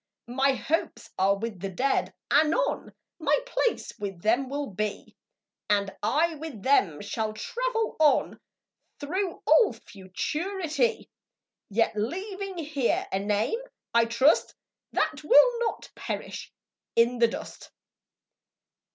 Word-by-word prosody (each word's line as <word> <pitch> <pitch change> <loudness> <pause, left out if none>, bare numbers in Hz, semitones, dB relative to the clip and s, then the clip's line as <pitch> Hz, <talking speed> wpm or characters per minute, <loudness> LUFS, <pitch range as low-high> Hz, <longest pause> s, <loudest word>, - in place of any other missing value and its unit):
My 270 +1 +3
hopes 320 +5 -2
are 195 +1 +3
with 215 -2 -5
the 195 - -3
Dead, 260 +9 0 0.2
anon 315 +11 +2 0.3
My - - +3
place - - -1
with 195 -4 -5
them 245 +5 +2
will 285 +1 -2
be, 210 +2 -4 0.5
And 200 -2 +1
I 315 +10 +2
with 300 -9 -8
them 200 - +3
shall 215 +1 -3
travel 460 - -2
on 305 -2 +3 0.6
Through 355 +5 -3
all 465 - +5
Futurity; 325 - -2 0.6
Yet 220 +2 +1
leaving 380 - -4
here 290 -6 0
a 190 - 0
name, 210 - 0 0.3
I 235 0 +5
trust, 235 +6 +3 0.4
That 305 0 -1
will 465 +11 +6
not 475 - -3
perish - - -5 0.4
in 235 +1 +3
the 235 - +6
dust. - - -8
275 Hz, 115 wpm, -27 LUFS, 210-340 Hz, 0.6 s, will